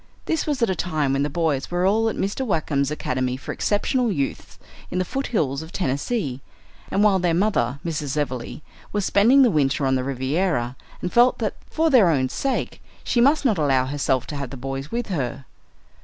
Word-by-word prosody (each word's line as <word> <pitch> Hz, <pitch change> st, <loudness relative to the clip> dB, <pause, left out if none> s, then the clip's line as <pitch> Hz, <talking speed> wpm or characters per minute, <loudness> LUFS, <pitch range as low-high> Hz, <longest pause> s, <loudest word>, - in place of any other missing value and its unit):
This 320 Hz, -, -1 dB
was 280 Hz, -5 st, 0 dB
at 230 Hz, -, +2 dB
a -, -, -1 dB
time 155 Hz, -7 st, -1 dB
when 135 Hz, -, +1 dB
the 145 Hz, -, 0 dB
boys 150 Hz, -3 st, -1 dB
were 175 Hz, +1 st, 0 dB
all 220 Hz, +3 st, +3 dB
at -, -, -4 dB
Mr. 200 Hz, +7 st, -2 dB
Wackem's 150 Hz, -, 0 dB
Academy 130 Hz, -4 st, -2 dB
for 135 Hz, -, -6 dB
Exceptional 235 Hz, +3 st, 0 dB
Youths 140 Hz, -7 st, -3 dB, 0.3 s
in 180 Hz, -, -3 dB
the 185 Hz, -, +1 dB
foothills 170 Hz, -, -1 dB
of 160 Hz, +1 st, -10 dB
Tennessee, 140 Hz, -, -2 dB, 0.5 s
and 200 Hz, -, +2 dB
while 200 Hz, -3 st, +4 dB
their 175 Hz, -2 st, +1 dB
mother, 155 Hz, -, +1 dB
Mrs. 150 Hz, -3 st, -3 dB
Everleigh, 130 Hz, -1 st, -3 dB, 0.3 s
was 205 Hz, -2 st, -1 dB
spending 245 Hz, +7 st, +5 dB
the 245 Hz, -, +4 dB
winter 140 Hz, -2 st, +1 dB
on 130 Hz, -, +2 dB
the 130 Hz, -1 st, +1 dB
Riviera 130 Hz, -1 st, -1 dB, 0.3 s
and 180 Hz, -, -3 dB
felt 240 Hz, +1 st, +5 dB
that 215 Hz, -3 st, -1 dB, 0.2 s
for 320 Hz, 0 st, +1 dB
their 225 Hz, -10 st, +6 dB
own 130 Hz, -5 st, +1 dB
sake 270 Hz, -, -2 dB, 0.2 s
she 240 Hz, -, +1 dB
must 285 Hz, +4 st, +4 dB
not 215 Hz, -9 st, +2 dB
allow 135 Hz, -4 st, +2 dB
herself 135 Hz, -2 st, 0 dB
to 150 Hz, -, -6 dB
have 140 Hz, -3 st, -4 dB
the 135 Hz, -, -8 dB
boys 135 Hz, +2 st, -5 dB
with 240 Hz, 0 st, -2 dB
her. 135 Hz, -6 st, -3 dB
160 Hz, 200 wpm, -23 LUFS, 135-210 Hz, 0.5 s, their